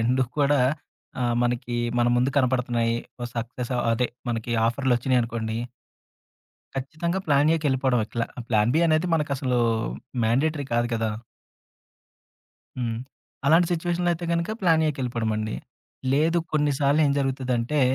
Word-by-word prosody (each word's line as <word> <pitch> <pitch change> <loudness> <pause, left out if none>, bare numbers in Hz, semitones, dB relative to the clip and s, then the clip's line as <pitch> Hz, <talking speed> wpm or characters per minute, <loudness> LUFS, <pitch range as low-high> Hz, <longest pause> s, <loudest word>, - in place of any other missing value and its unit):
2 125 +3 +2 0.2
కూడా 145 -1 +3 0.6
ఆహ్, 120 -1 +1
మనకి 120 0 -1 0.2
మన 120 - +3
ముందు 125 +3 +2
కనపడుతున్నాయి. 120 -3 +1 0.2
ఓ - - -2
సక్సెసో, 120 +2 -3 0.2
అదే 125 +2 +1 0.2
మనకి 115 0 -3 0.2
ఆఫర్‌‌లొచ్చినాయనుకోండి... 120 -3 0 1.2
ఖచ్చితంగా 155 +7 -2
ప్లాన్ 145 0 +4
ఏకెళ్ళిపోవడం. 130 -5 +1
ప్లా 115 -1 0 0.2
ప్లాన్ 110 0 +3
బీ 165 - +4
అనేది 155 +2 +2
మనకసలు 140 -5 0 0.7
మాండేటరీ 140 +5 +1
కాదు 120 0 +2
కదా! 110 -1 0 1.7
హ్మ్. 115 -2 -1 0.5
అలాంటి 165 +4 +5
సిట్యుయేషన్‌లో 175 +1 0
అయితే 170 +1 -4
గనక 170 +3 0
ప్లాన్ 165 -3 +4
ఏకెళ్ళిపోవడమండి. 115 -6 -2 0.6
లేదు 160 +4 +3
కొన్ని 150 -1 +2
సార్లు 145 +2 +3
ఏం 140 - +2
జరుగుతదంటే, 130 0 0
130 Hz, 115 wpm, -25 LUFS, 120-150 Hz, 1.7 s, అలాంటి